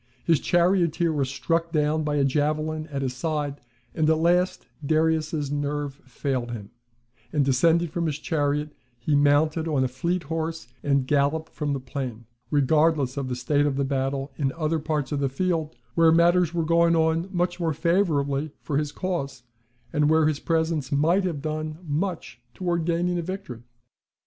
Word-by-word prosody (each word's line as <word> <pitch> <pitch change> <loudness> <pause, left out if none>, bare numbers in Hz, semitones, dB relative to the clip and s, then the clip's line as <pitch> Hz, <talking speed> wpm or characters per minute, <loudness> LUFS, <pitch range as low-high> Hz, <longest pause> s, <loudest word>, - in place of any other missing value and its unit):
His 165 -4 +4
charioteer 175 -2 +2
was 140 -3 0
struck 165 +4 -1
down 155 0 +1
by 150 -1 -1
a 145 - +2
javelin 155 +2 0
at 140 -3 -3
his 130 -1 -2
side; 145 0 -2 0.3
and 155 -1 +1
at 160 - +4
last 175 +3 +2 0.2
Darius's 155 -1 +1
nerve 145 -1 -2
failed 130 -1 -2
him; 105 -4 -7 0.6
and, 145 -3 +2
descending 165 +6 +3
from 165 +1 -2
his 150 -2 -2
chariot, 150 -1 -1 0.2
he 120 +6 -2
mounted 145 +3 +3
on 145 -4 +1
a - - +2
fleet 170 +8 -2
horse 160 -1 -3
and 140 -2 +1
galloped 145 +3 0
from 145 -2 -2
the 140 - -2
plain, 125 -3 -6 0.2
regardless 150 -1 +2
of 140 -2 -3
the 125 - -2
state 145 +4 +1
of 140 - -1
the 140 0 0
battle 135 0 -2
in 135 -3 0
other 160 0 -1
parts 150 -2 -2
of 145 - -1
the 140 -1 +1
field, 160 +1 -1 0.2
where 165 -1 +5
matters 170 0 +4
were 170 -2 -1
going 170 +1 +4
on 160 +2 +1
much 175 -1 -1
more 165 -2 0
favourably 155 -4 +1
for 145 -2 -1
his 150 -1 -2
cause, 140 -9 -4 0.5
and 150 -1 +3
where 160 0 +4
his 155 -2 0
presence 160 -4 0
might 165 +7 +3
have 155 -6 -3
done 155 0 -3
much 160 -5 -3
towards 170 -3 -1
gaining 175 +1 0
a - - 0
victory. 175 - -6
155 Hz, 175 wpm, -25 LUFS, 140-165 Hz, 0.6 s, where